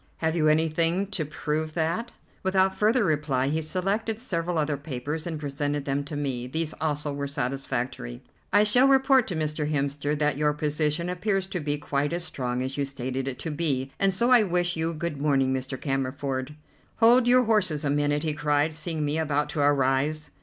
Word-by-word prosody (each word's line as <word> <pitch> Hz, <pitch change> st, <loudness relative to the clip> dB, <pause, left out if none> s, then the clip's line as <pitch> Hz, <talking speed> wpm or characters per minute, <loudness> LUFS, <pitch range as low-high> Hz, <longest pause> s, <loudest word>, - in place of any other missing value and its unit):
"Have 160 Hz, 0 st, 0 dB
you 155 Hz, -2 st, +2 dB
anything 165 Hz, +4 st, +2 dB
to 160 Hz, -6 st, -1 dB
prove 155 Hz, +1 st, -3 dB
that?" 170 Hz, +9 st, -1 dB, 0.3 s
Without 190 Hz, -1 st, +2 dB
further 215 Hz, +5 st, +3 dB
reply 145 Hz, -6 st, +1 dB
he 155 Hz, +2 st, 0 dB
selected 195 Hz, +7 st, -1 dB
several 175 Hz, -7 st, -2 dB
other 150 Hz, -1 st, +1 dB
papers 145 Hz, +3 st, -5 dB
and 160 Hz, -3 st, -4 dB
presented 145 Hz, 0 st, -2 dB
them 140 Hz, 0 st, -1 dB
to 150 Hz, -, -6 dB
me. 130 Hz, -4 st, -2 dB
These 160 Hz, +4 st, -2 dB
also 150 Hz, -2 st, -1 dB
were 140 Hz, 0 st, -3 dB
satisfactory. 125 Hz, -, -3 dB, 0.3 s
"I 205 Hz, -, +5 dB
shall 245 Hz, +6 st, +5 dB
report 270 Hz, -2 st, +4 dB
to 180 Hz, -, -3 dB
Mr. 155 Hz, -1 st, -2 dB
Hemster 145 Hz, +1 st, -1 dB
that 150 Hz, -2 st, +1 dB
your 150 Hz, 0 st, +2 dB
position 150 Hz, +2 st, -1 dB
appears 190 Hz, +2 st, -1 dB
to 190 Hz, -1 st, -4 dB
be 145 Hz, -1 st, -2 dB
quite 145 Hz, +1 st, -1 dB
as 175 Hz, 0 st, +1 dB
strong 125 Hz, -4 st, -3 dB
as 130 Hz, +2 st, -4 dB
you 140 Hz, -, +1 dB
stated 130 Hz, 0 st, -4 dB
it 130 Hz, -2 st, -3 dB
to 160 Hz, +4 st, -4 dB
be, 140 Hz, -4 st, -1 dB
and 195 Hz, 0 st, +4 dB
so 235 Hz, +7 st, +1 dB
I 245 Hz, -2 st, +8 dB
wish 180 Hz, -2 st, +1 dB
you 165 Hz, +1 st, -1 dB
good 155 Hz, -3 st, -4 dB
morning, 135 Hz, -3 st, +2 dB
Mr. 130 Hz, 0 st, -4 dB
Cammerford." 135 Hz, 0 st, -2 dB, 0.4 s
"Hold 240 Hz, +2 st, +5 dB
your 250 Hz, +1 st, +6 dB
horses 185 Hz, -10 st, +1 dB
a 140 Hz, -, +1 dB
minute," 145 Hz, 0 st, +1 dB
he 155 Hz, -2 st, 0 dB
cried, 145 Hz, +1 st, +1 dB
seeing 155 Hz, -1 st, -3 dB
me 150 Hz, +2 st, 0 dB
about 150 Hz, -2 st, 0 dB
to 155 Hz, -, -4 dB
arise. 145 Hz, +2 st, +1 dB
150 Hz, 190 wpm, -26 LUFS, 140-175 Hz, 0.4 s, I